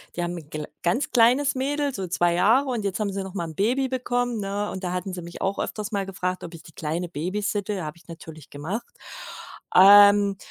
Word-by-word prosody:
die 175 - -2
haben 175 0 -3
'n 155 -3 -11
gl 150 -1 -5 0.2
ganz 180 +11 0
kleines 255 +4 +4
Mädel, 285 +1 -1
so 190 - -3
2 175 0 +1
Jahre 235 +10 +3
und 240 -4 -2
jetzt 200 +1 -2
haben 205 -2 -1
sie 195 0 -4
noch 190 - -8
mal 175 -4 -3
'n 160 -2 -9
Baby 250 +8 +1
bekommen, 245 -2 -1
ne? 205 +1 -3
Und 190 - -7
da 180 0 -2
hatten 185 +1 -4
sie 180 - -5
mich 170 0 -10
auch 195 +1 -1
öfters 210 +1 -4
mal 200 -2 -1
gefragt, 185 -1 -4
ob 170 - -8
ich 165 - -10
die 160 - -15
Kleine 165 +3 -3
babysitte. 200 +4 -3
Habe 155 +1 -7
ich - - -22
natürlich 160 -3 -11
gemacht. 195 - -6 0.8
Ähm, 200 +1 +7
195 Hz, 225 wpm, -24 LUFS, 175-225 Hz, 0.8 s, Ähm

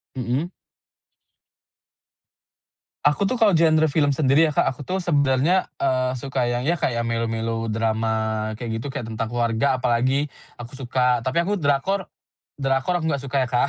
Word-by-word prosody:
Mhm. 130 +7 -2 2.5
Aku 150 +7 +3
tuh 195 - 0
kalo 220 -8 +4
genre 160 -1 +4
film 145 -1 +2
sendiri 145 +2 +4
ya, 155 - 0
Kak, - - +3
aku 130 - -2
tuh 190 +1 -2
sebenernya, 145 +2 +2 0.2
eee, 130 -1 +1
suka 135 -2 -1
yang 120 0 -1
ya, 170 +6 0
kayak 115 -5 -1
melo 115 0 -1
melodrama 110 -1 -1
kayak 110 0 -4
gitu, 135 +4 -6
kayak 115 - -5
tentang 115 0 -3
keluarga 120 +3 0
apalagi, 130 +5 +1 0.2
aku 120 +2 -10
suka, 125 -1 +1
tapi 130 +6 +1
aku 205 +4 -1
drakor 175 +5 0 0.5
drakor 135 +5 0
aku 170 - -3
gak 140 - -1
suka 140 +1 -4
ya, - - -6
Kak. 125 +3 +2
130 Hz, 160 wpm, -23 LUFS, 115-150 Hz, 2.5 s, kalo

